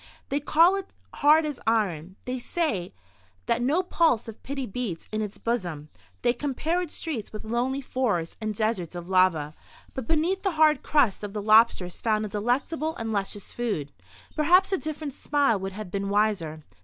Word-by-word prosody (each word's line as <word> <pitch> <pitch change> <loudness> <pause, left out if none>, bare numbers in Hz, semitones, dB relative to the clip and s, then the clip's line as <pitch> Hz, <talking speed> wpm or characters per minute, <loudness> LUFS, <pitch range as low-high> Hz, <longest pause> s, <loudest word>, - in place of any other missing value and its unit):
They 280 - 0
call 330 +6 +5
it 390 -1 -4 0.2
hard 305 +2 +5
as 295 -4 -4
iron; 190 -6 0
they 255 0 -3
say 240 - -1 0.5
that 235 0 +1
no 300 +9 +2
pulse 325 -11 +2
of 225 - -9
pity 275 -1 -4
beats 200 -6 -4
in 215 0 -1
its 210 -2 -5
bosom; 175 -11 -3 0.3
they 240 - +4
compare 295 +7 -1
its 345 -4 -6
streets 285 -10 -4
with 215 - -7
lonely 245 +5 -1
forests 215 -11 -1
and 215 -1 -2
deserts 210 -6 -1
of 175 0 -6
lava. 180 -5 +3 0.4
But 260 -4 -5
beneath 330 +5 +1
the 390 -3 0
hard 310 -1 +4
crust 250 -10 +2
of 205 -1 -5
the 210 - -3
lobster 215 -2 +5
is 175 - -8
found 215 -1 +1
a - - -5
delectable 265 +10 -1
and 225 -1 -4
luscious 200 -1 -3
food. 205 -13 -3 0.4
Perhaps 360 +6 +4
a 385 - +1
different 310 -2 -5
simile 280 -7 +1
would 190 0 -5
have 210 -2 -7
been 200 0 -2
wiser. 200 -7 0
230 Hz, 180 wpm, -26 LUFS, 200-295 Hz, 0.5 s, call